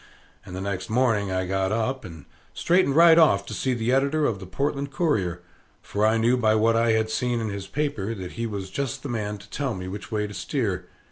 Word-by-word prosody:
And 90 - -9
the 95 - -4
next 95 +1 -4
morning 110 -4 +2
I 95 0 -1
got 95 +1 0
up, 120 +4 -1
and 80 -4 -10 0.3
straightened 175 -5 +2
right 165 0 +7
off 100 -12 +4
to - - -7
see 130 +4 -1
the 115 +1 -1
editor 140 +3 +2
of 105 -7 0
the 95 - -9
"Portland 140 +7 -2
Courier," 100 - 0 0.4
for 105 +1 +1
I 110 +1 +3
knew 120 +3 +3
by 110 -3 +3
what 115 +1 +3
I 115 0 +3
had 110 0 +1
seen 120 +1 0
in 110 -1 -2
his 100 -1 -5
paper, 115 -7 -2
that 95 -3 -7
he 115 0 -3
was 100 -3 -5
just 135 -1 -3
the 140 - -5
man 105 -3 -3
to 100 0 -15
tell 135 -5 -2
me 90 0 -6
which 100 +2 -7
way 105 -1 0
to 105 - -7
steer. 100 -9 -2
110 Hz, 230 wpm, -25 LUFS, 100-130 Hz, 0.4 s, right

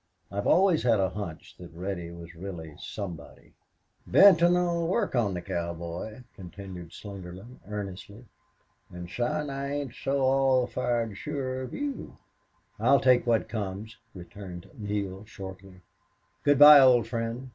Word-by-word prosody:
I've 100 0 -3
always 180 -2 +4
had 115 -4 +3
a 95 -1 +1
hunch 95 -6 -7
that 90 -1 -11
Reddy 90 -1 -5
was 85 0 -11
really 85 -3 -8
somebody." 85 -10 -8 0.5
"Benton 175 -3 +6
'll 170 -2 0
work 180 - 0
on 105 -6 +1
the 90 - -5
cowboy," 85 +7 -5
continued 90 -2 -9
Slingerland, 100 +5 -10
earnestly. 105 +2 -7 0.7
"An', 90 0 -8
son, 140 - -2
I 140 0 -4
ain't 140 -4 -3
so 140 +2 -2
all 130 -1 +3
fired 120 -4 -2
sure 130 -2 -4
of 130 -1 -6
you." 285 -1 -5 0.6
"I'll 140 - +4
take 125 -2 +3
what 115 -2 +2
comes," 105 0 -5 0.2
returned 90 0 -10
Neale, 100 -2 -4
shortly. 95 -2 -10 0.6
"Good 145 -1 +4
bye, 145 +1 +11
old 125 -4 +6
friend. 115 +2 -4
105 Hz, 135 wpm, -27 LUFS, 90-130 Hz, 0.7 s, bye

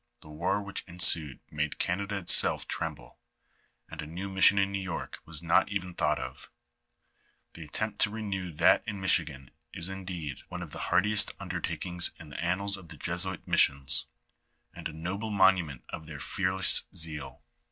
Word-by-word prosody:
The 75 - -14
war 90 +7 -2
which 100 -1 -6
ensued 85 -5 +3
made 75 0 -3
Canada 100 +3 -2
itself 90 -3 +5
tremble, - - -5 0.7
and 80 -1 -8
a 75 - -8
new 90 +5 -6
mission 95 +1 +5
in 100 0 +2
New 100 0 -3
York 90 -3 -6
was 80 0 -6
not 85 +3 +3
even 90 -3 -4
thought - - 0
of; - - -8 1.0
the 80 - -9
attempt 105 +8 -4
to 105 - +3
renew 100 -4 -4
that 75 - +4
in 105 -2 -4
Michigan 80 -9 +1 0.2
is, 85 - 0
indeed, 90 -7 -6
one - - -6
of - - -10
the - - -8
hardiest 100 +3 +3
undertakings 90 -1 -2
in 80 -3 -12
the 75 - -6
annals 100 +3 +1
of 90 -4 -14
the - - -10
Jesuit 90 +1 0
missions, 70 -1 +2 0.7
and - - -6
a - - -8
noble 90 +8 -5
monument 95 - +2
of 80 - -8
their 75 -3 -8
fearless 95 +4 +2
zeal. 80 -4 -3
90 Hz, 165 wpm, -29 LUFS, 80-100 Hz, 1.0 s, itself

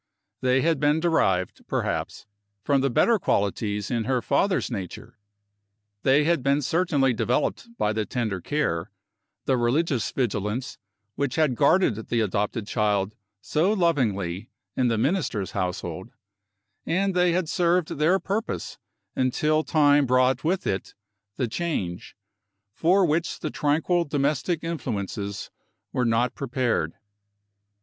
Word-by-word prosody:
They 130 +1 +3
had 165 -3 +2
been 150 +1 +3
derived, 95 - 0
perhaps, - - -2 0.4
from 140 -2 +2
the 140 - +2
better 220 - +3
qualities 105 - -1
in 115 -2 0
her 130 +1 +1
father's 180 +10 +1
nature; 95 +1 -7 0.8
they 135 +3 +4
had 170 -1 +2
been 140 +2 +1
certainly 145 -3 +2
developed 125 - -1
by 105 - +1
the 110 0 0
tender 105 -5 -3
care, 90 - -1 0.6
the 130 - +2
religious 125 +2 +1
vigilance, 110 0 -2 0.3
which 140 -3 -2
had 155 -5 +2
guarded 140 - +2
the 120 - +1
adopted 105 +1 -1
child 105 -2 0 0.3
so 170 +7 +1
lovingly 115 - 0 0.3
in 125 - +2
the 115 -2 +1
Minister's 125 - 0
household; 90 -2 -3 0.7
and 195 +3 0
they 180 -1 +3
had 180 -1 0
served 175 0 +1
their 165 +5 +4
purpose 200 +3 -3 0.4
until 150 +5 +1
time 145 -3 +4
brought 125 0 +3
with 175 +4 0
it 95 -1 -3 0.4
the 125 - -1
change, 110 - -3 0.6
for 185 - +3
which 165 +1 -1
the - - -4
tranquil 160 +4 +1
domestic 150 +3 0
influences 105 - -4 0.4
were 125 - +1
not 115 +2 +1
prepared. 125 - -1
130 Hz, 125 wpm, -25 LUFS, 110-160 Hz, 0.8 s, they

